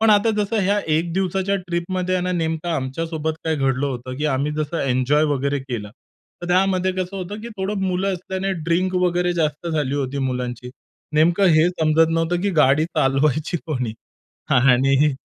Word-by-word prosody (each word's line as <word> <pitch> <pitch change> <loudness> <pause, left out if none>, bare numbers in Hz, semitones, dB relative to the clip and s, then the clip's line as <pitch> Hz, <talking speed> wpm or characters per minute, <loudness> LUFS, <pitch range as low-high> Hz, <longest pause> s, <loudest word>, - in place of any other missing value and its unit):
पण 220 -1 +4
आता 210 +2 +4
जसं 210 +2 0
ह्या 200 +2 +2 0.2
1 165 +2 0
दिवसाच्या 190 +1 0
ट्रिपमध्ये 180 0 -2
आहे 180 - 0
ना, 180 - -1
नेमकं 160 -1 -2
आमच्यासोबत 160 +2 -2
काय 160 -1 +1
घडलं 135 0 0
होतं, 130 -1 -5
की 150 - -3
आम्ही 145 +1 0
जसं 155 +2 -2
एन्जॉय 135 +3 +2
वगैरे 140 +1 0
केलं. 120 -6 -6 0.5
तर 175 - -4
त्यामध्ये 185 0 +2
कसं 185 +1 -4
होतं, 195 +3 -6
की 235 - -7
थोडं 195 +1 -2
मुलं 190 +2 0
असल्याने 190 +2 -3
ड्रिंक 180 +3 0
वगैरे 180 0 +1
जास्त 155 -1 -1
झाली 150 -4 -1
होती 140 -1 -2
मुलांची. 125 -1 -4 0.4
नेमकं 170 +5 +4
हे 160 +2 +5
समजत 160 -2 +2
नव्हतं, 165 +1 0
की 200 - +1
गाडी 145 +3 +4
चालवायची 150 +1 +1
कोणी 125 -8 -2 0.6
आणि 135 +3 +4
160 Hz, 170 wpm, -21 LUFS, 140-185 Hz, 0.6 s, हे